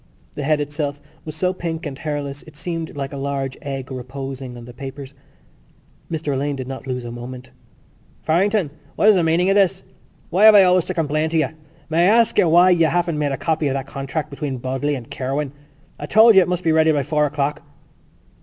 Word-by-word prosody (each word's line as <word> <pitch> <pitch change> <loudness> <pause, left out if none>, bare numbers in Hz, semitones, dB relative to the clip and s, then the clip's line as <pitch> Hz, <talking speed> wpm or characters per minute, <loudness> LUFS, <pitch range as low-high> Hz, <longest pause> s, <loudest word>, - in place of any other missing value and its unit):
The - - -5
head 150 +1 +1
itself 145 0 -3 0.3
was 155 -1 -7
so 180 +3 0
pink 165 -1 -5
and 145 -3 -5
hairless 145 -1 -4
it 155 -2 -14
seemed 165 -1 -5
like 135 0 -4
a - - -5
large 135 -1 -3
egg 135 -2 -6
reposing 130 0 -6
on 120 - -10
the 120 - -11
papers. 135 +2 -8 1.0
Mr 155 -3 -2
Alleyne 140 +2 -1
did 130 -2 -6
not 135 0 -7
lose 125 -2 -3
a 120 - -6
moment: 125 +2 -9 0.7
"Farrington? 185 0 +1 0.2
What 215 - +4
is - - +8
the 180 - +3
meaning 170 +3 +2
of - - +2
this? 190 -1 +2 0.5
Why 190 +5 +4
have 220 -1 +9
I 200 - +9
always 180 -1 +3
to 185 - -4
complain 155 -2 0
of 160 - -7
you? 155 - +2 0.4
May 165 +3 +3
I 220 - +5
ask 230 -1 +2
you 175 - +4
why 175 +3 +6
you 165 -2 +4
haven't 170 -2 0
made 145 -1 0
a 135 - -2
copy 160 -2 0
of 135 - -1
that 135 -1 -3
contract 140 +3 -5
between 140 -2 -4
Bodley 130 +4 -2
and 120 -4 -9
Kirwan? 135 +2 -3 0.5
I - - -5
told 220 +2 +7
you 190 - +7
it 180 - +1
must 180 0 -2
be 165 - +2
ready 160 0 +4
by 145 -2 +1
four 150 +1 +1
o'clock." 145 0 -2
150 Hz, 220 wpm, -21 LUFS, 135-170 Hz, 1.0 s, have